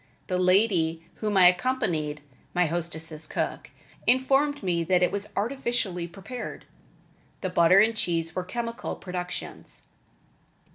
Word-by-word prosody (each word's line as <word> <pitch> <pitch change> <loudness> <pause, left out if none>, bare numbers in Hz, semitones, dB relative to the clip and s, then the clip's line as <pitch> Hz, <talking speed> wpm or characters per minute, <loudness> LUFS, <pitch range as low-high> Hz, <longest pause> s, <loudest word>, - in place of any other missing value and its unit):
The 180 -1 -1
lady 180 -4 +3
whom 210 -2 0
I 185 - +7
accompanied 180 - +2 0.3
(my 180 0 +4
hostess' 160 -1 -4
cook) - - -3 0.4
informed 270 +2 +3
me 175 -3 +1
that 180 +1 +3
it 180 - +3
was 200 +1 -4
artificially 220 -6 -1
prepared. 205 +8 -7 0.8
The 185 - -2
butter 175 +2 +6
and 225 +2 +3
cheese 165 -5 -1
were 185 - -2
chemical 230 +4 -4
productions. 180 -1 -6
185 Hz, 125 wpm, -27 LUFS, 170-225 Hz, 0.8 s, I